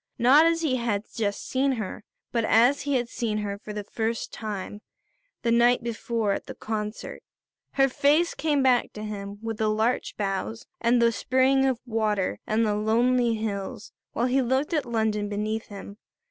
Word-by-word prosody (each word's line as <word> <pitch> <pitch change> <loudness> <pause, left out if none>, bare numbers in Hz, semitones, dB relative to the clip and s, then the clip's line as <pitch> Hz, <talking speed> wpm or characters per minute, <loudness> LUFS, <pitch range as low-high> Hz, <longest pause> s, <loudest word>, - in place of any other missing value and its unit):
Not 280 +7 +6
as 330 0 +1
he 265 -5 +1
had 225 -4 -1
just 205 -3 -2
seen 270 +1 +1
her, 220 -2 -5 0.3
but 230 -1 0
as 240 +6 +4
he 285 -1 -1
had 245 -2 0
seen 225 -2 -2
her, 200 -1 -3
for 215 - -9
the 210 0 -4
first 225 +2 -3
time, 210 -1 -5 0.6
the 235 - +1
night 240 +1 +4
before 230 -2 -1
at - - -3
the - - -7
concert. 215 -1 -5 0.5
Her 270 0 +4
face 295 +6 +2
came 295 -3 +1
back 250 -2 +3
to 210 - -7
him 200 -1 -6
with 225 -1 -3
the 215 -1 +2
larch 220 +4 0
boughs 200 +2 -3
and 235 +1 +3
the 235 0 +4
spring 260 +3 +2
of 260 -3 +1
water 215 -5 -1
and 225 +1 +2
the 210 - +1
lonely 235 +3 +2
hills, 215 +1 -4 0.2
while 235 - 0
he 260 +2 +2
looked 265 +6 0
at 295 -5 0
London 220 -3 0
beneath 215 +2 -3
him. 200 0 -10
230 Hz, 180 wpm, -26 LUFS, 210-255 Hz, 0.6 s, Not